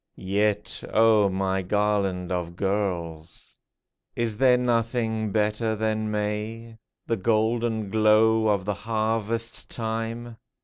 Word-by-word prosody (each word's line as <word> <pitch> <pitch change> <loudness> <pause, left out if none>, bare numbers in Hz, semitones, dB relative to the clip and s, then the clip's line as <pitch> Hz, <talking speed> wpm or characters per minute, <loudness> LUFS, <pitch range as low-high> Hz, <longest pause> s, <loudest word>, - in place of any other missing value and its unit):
Yet, 105 +2 -1
O 110 -2 +4
my 95 0 -1
garland 100 -2 0
of 85 -1 -3
girls! 90 -5 -3 0.6
Is 115 -2 -1
there 125 0 +5
nothing 115 -3 0
better 110 +1 0
than 110 0 -1
May? 105 +2 -4 0.3
The 115 - -1
golden 110 0 0
glow 110 +1 +4
of 100 -3 +1
the 105 - 0
harvest 115 +1 -2
time 115 +1 -4
110 Hz, 105 wpm, -25 LUFS, 100-115 Hz, 0.6 s, there